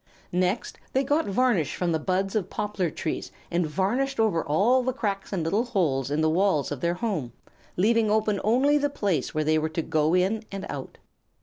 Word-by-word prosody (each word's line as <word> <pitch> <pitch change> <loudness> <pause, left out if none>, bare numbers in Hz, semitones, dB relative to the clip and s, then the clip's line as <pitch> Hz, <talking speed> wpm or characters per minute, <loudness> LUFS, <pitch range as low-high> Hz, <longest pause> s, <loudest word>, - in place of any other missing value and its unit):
Next 185 +5 -1
they 265 - +2
got 295 +4 +1
varnish 200 - +1
from 180 -2 -1
the 160 - +1
buds 190 +5 -1
of 205 -5 -1
poplar 205 -4 -2
trees 155 - -4 0.2
and 170 -1 +1
varnished 235 - -1
over 210 -7 +2
all 210 - +3
the 255 +1 -1
cracks 200 -6 -3
and 185 -5 -1
little 200 +8 +1
holes 155 - 0
in 145 +2 0
the 160 - +3
walls 175 -5 +1
of 140 -3 -4
their 170 +1 +1
home, 175 - -3 0.4
leaving 220 +3 +3
open 210 -2 +1
only 270 +7 +3
the 290 0 +1
place 195 - -1
where 155 - +1
they 155 +1 +2
were 160 +1 -1
to 160 +1 -2
go 155 +2 +1
in 195 +4 +1
and 195 0 -5
out. - - -7
195 Hz, 200 wpm, -26 LUFS, 160-225 Hz, 0.4 s, all